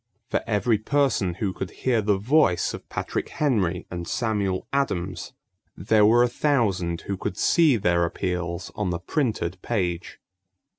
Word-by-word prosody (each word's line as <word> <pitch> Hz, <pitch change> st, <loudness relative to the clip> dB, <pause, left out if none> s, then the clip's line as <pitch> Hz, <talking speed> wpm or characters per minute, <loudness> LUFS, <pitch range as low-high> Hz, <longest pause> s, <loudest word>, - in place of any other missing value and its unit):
For -, -, +1 dB
every 105 Hz, 0 st, +2 dB
person 120 Hz, -8 st, +1 dB
who 95 Hz, 0 st, -2 dB
could 95 Hz, -, -5 dB
hear 120 Hz, -4 st, 0 dB
the 105 Hz, -1 st, +2 dB
voice 115 Hz, -, +2 dB
of -, -, -9 dB
Patrick -, -, -3 dB
Henry 100 Hz, -, 0 dB
and 85 Hz, -1 st, -5 dB
Samuel 105 Hz, -6 st, -1 dB
Adams, 95 Hz, -10 st, -2 dB, 0.4 s
there 105 Hz, +2 st, +4 dB
were 120 Hz, +2 st, +5 dB
a -, -, +4 dB
thousand 105 Hz, -, 0 dB
who 100 Hz, -, -3 dB
could 95 Hz, 0 st, -4 dB
see 160 Hz, -7 st, +4 dB
their 90 Hz, -4 st, +2 dB
appeals 85 Hz, 0 st, -3 dB
on 105 Hz, -3 st, -2 dB
the 85 Hz, -, -1 dB
printed 95 Hz, -, -2 dB
page. 90 Hz, -6 st, -2 dB
100 Hz, 150 wpm, -25 LUFS, 90-120 Hz, 0.4 s, were